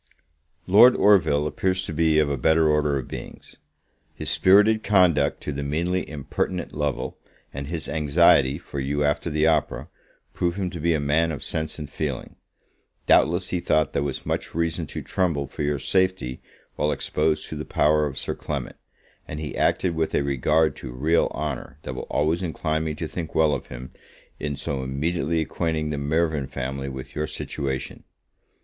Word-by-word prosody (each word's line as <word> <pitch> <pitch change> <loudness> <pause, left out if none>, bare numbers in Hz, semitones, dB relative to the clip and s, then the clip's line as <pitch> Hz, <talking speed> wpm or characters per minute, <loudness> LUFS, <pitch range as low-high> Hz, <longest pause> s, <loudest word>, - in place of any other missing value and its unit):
Lord 110 +7 +7
Orville 80 -8 +4
appears 95 +4 0
to 80 - -5
be 80 0 +2
of 75 -1 +4
a 70 - 0
better 80 +4 +3
order 75 -2 +2
of 65 - -5
beings. - - -9 0.6
His - - -1
spirited 105 +3 +5
conduct 90 -10 +3
to - - -3
the 70 0 -4
meanly 85 +6 -1
impertinent 75 +4 -3
Lovel, 75 -2 -3 0.3
and 70 0 -5
his 80 0 -4
anxiety 75 -2 +4
for 70 -4 -7
you 70 +2 -1
after 75 +3 0
the 75 0 +1
opera, 80 -3 +1 0.4
prove 85 -1 -1
him 95 -3 -2
to 85 - -6
be 85 +1 +2
a - - 0
man 75 +3 +1
of 75 - -6
sense 80 -1 -3
and 75 -2 -6
feeling. 70 -2 -5 0.7
Doubtless 85 +3 +3
he 90 - -1
thought 75 -3 +1
there - - 0
was 70 -2 -4
much - - -3
reason 80 -1 -1
to - - -6
tremble 85 -7 0
for - - -8
your 75 0 0
safety 95 -5 0 0.4
while 75 - +1
exposed 75 +1 0
to - - -5
the - - -4
power 75 0 +2
of 70 - -7
Sir - - -2
Clement; - - -5 0.5
and 75 - -6
he 75 -2 -5
acted 90 - +1
with 80 -1 -1
a 70 - +2
regard 70 +3 +2
to 65 - -7
real 75 +7 +2
honour, 70 -3 -5
that - - -5
will - - -6
always 80 +4 +1
incline 80 -2 -1
me 75 -1 -2
to 80 +1 -4
think 80 0 -6
well 80 -2 +4
of - - -4
him, 60 +1 -9 0.5
in 75 -1 -3
so 70 0 -3
immediately 80 +4 -1
acquainting 80 0 -2
the 75 - -2
Mirvan 75 -1 0
family 70 +1 -4
with 65 -1 -8
your 75 0 -1
situation. 65 -2 -4
75 Hz, 180 wpm, -24 LUFS, 70-85 Hz, 0.7 s, Lord